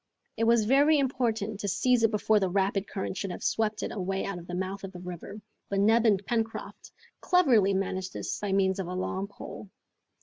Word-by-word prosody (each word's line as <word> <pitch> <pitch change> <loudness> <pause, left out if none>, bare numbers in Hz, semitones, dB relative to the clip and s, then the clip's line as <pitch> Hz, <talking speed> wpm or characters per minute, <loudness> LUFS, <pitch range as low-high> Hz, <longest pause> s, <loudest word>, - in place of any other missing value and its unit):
It 225 - 0
was 230 -1 +4
very 285 +6 +5
important 230 -6 -1
to 205 - -3
seize 240 +5 +2
it 225 - +4
before 215 0 +2
the 190 -2 0
rapid 195 +1 0
current 190 -1 -4
should 195 - -3
have 180 - -6
swept 220 -1 0
it - - -3
away 190 -1 -2
out 195 -3 -4
of 170 - -12
the 175 - -5
mouth 190 +2 -4
of 195 - -6
the 180 - -8
river, 180 +4 -8 0.3
but 200 - 0
Neb 225 +3 +4
and 200 -2 +2
Pencroft 225 -1 -3 0.3
cleverly 235 - +4
managed 185 -1 -2
this - - -4
by 205 -1 -3
means 190 0 +2
of 190 - -3
a 180 - -4
long 190 +1 -2
pole. 200 0 -10
200 Hz, 210 wpm, -28 LUFS, 190-225 Hz, 0.3 s, very